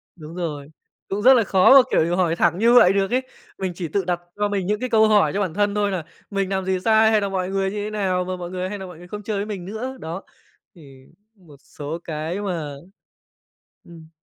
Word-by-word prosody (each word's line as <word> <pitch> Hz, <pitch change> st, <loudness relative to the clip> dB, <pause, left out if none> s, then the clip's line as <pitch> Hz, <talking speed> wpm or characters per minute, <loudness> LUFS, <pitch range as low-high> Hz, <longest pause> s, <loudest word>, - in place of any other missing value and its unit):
Đúng 160 Hz, 0 st, -11 dB
rồi, 150 Hz, -4 st, -5 dB, 0.4 s
cũng 200 Hz, +2 st, -2 dB
rất 260 Hz, +4 st, +7 dB
là 235 Hz, -3 st, +4 dB
khó 190 Hz, +6 st, +5 dB
mà, -, -, +10 dB
kiểu, 170 Hz, +2 st, +2 dB
hỏi 170 Hz, -3 st, +1 dB
thẳng 175 Hz, 0 st, +2 dB
như 235 Hz, +2 st, +4 dB
vậy 195 Hz, -6 st, +7 dB
được 195 Hz, +2 st, 0 dB
ấy. 255 Hz, +1 st, +2 dB, 0.4 s
Mình 190 Hz, -2 st, -3 dB
chỉ 170 Hz, -1 st, -4 dB
tự 190 Hz, +3 st, -2 dB
đặt 175 Hz, -1 st, -1 dB, 0.2 s
cho 205 Hz, 0 st, 0 dB
mình 195 Hz, -3 st, -2 dB
những 210 Hz, 0 st, 0 dB
cái 255 Hz, 0 st, -3 dB
câu 220 Hz, -1 st, +4 dB
hỏi 205 Hz, -9 st, +3 dB
cho 205 Hz, -, -1 dB
bản 180 Hz, -5 st, -2 dB
thân 205 Hz, +1 st, 0 dB
thôi 205 Hz, -1 st, +1 dB
là 180 Hz, -4 st, -3 dB, 0.3 s
"Mình 195 Hz, -2 st, -2 dB
làm 190 Hz, -1 st, -2 dB
gì 190 Hz, -1 st, 0 dB
sai 220 Hz, 0 st, +5 dB
hay 215 Hz, -1 st, +3 dB
là 200 Hz, -, -1 dB
mọi 185 Hz, -1 st, -2 dB
người 195 Hz, 0 st, -1 dB
như -, -, -7 dB
thế -, -, -4 dB
nào 190 Hz, -4 st, -1 dB
mà 185 Hz, 0 st, -3 dB
mọi 175 Hz, -1 st, -6 dB
người 185 Hz, 0 st, -4 dB
hay 205 Hz, -, -5 dB
nà 190 Hz, -, -7 dB
mọi 180 Hz, -3 st, -11 dB
người 175 Hz, +1 st, -13 dB
không 210 Hz, +1 st, -7 dB
chơi 210 Hz, -1 st, -3 dB
với 200 Hz, -, -2 dB
mình 195 Hz, -5 st, -6 dB
nữa?" 245 Hz, +6 st, -6 dB
Đó, 165 Hz, +4 st, -6 dB, 0.5 s
thì 135 Hz, -5 st, -16 dB, 0.3 s
một 170 Hz, -7 st, -18 dB
số 150 Hz, +4 st, -7 dB
cái 160 Hz, +5 st, -4 dB
mà 165 Hz, -7 st, -4 dB, 1.1 s
ừm. 165 Hz, -2 st, -14 dB
190 Hz, 250 wpm, -22 LUFS, 170-205 Hz, 1.1 s, mà